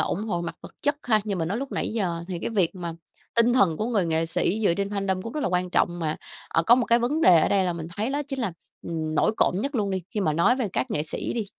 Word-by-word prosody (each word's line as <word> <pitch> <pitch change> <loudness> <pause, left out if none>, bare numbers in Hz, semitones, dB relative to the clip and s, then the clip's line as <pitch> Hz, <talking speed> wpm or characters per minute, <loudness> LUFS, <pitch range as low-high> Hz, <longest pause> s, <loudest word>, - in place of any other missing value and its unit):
ủng 205 - -1
hộ 175 -6 -2
mặt 170 - -5
vật - - -11
chất 290 +1 +1
ha 215 -3 +3
như 200 -3 -2
mình 165 -2 -1
nói 205 +6 -1
lúc 275 0 -5
nãy - - -1
giờ 175 -6 -1
thì 180 -2 -3
cái 175 - -3
việc 195 -6 +1
mà 175 -2 -5 0.4
tinh 235 +1 +4
thần 185 -10 +3
của 220 - -2
người 215 -6 +1
nghệ 165 0 +1
sĩ 185 +5 0
dựa 170 - +4
trên 200 +2 -1
fandom 195 -2 -1
cũng 230 - -6
rất 305 - -3
là - - 0
quan 180 0 0
trọng. 175 0 +1
Mà, 155 -2 -1 0.3
ờ, 165 - +2
có 230 +8 +6
một 245 -1 +1
cái 235 - +4
vấn 255 +7 0
đề 175 - +7
ở - - +2
đây 195 -1 +3
là 180 - 0
mình 165 -2 -6
thấy 220 +5 -1
đó 290 +1 -1
chính 270 - -4
là, 200 -7 -1 0.3
ừm, 160 -2 -3
nổi 160 - +3
cộm - - +3
nhất 280 +4 -3
luôn 205 -5 0
đi, 190 -1 -2
khi 210 - -2
mà 160 -6 +1
nói 170 +11 +3
về 250 -6 -1
các 255 - -1
nghệ 150 - 0
sĩ 155 - -4
đi, 230 -2 -2
195 Hz, 305 wpm, -25 LUFS, 170-230 Hz, 0.4 s, đề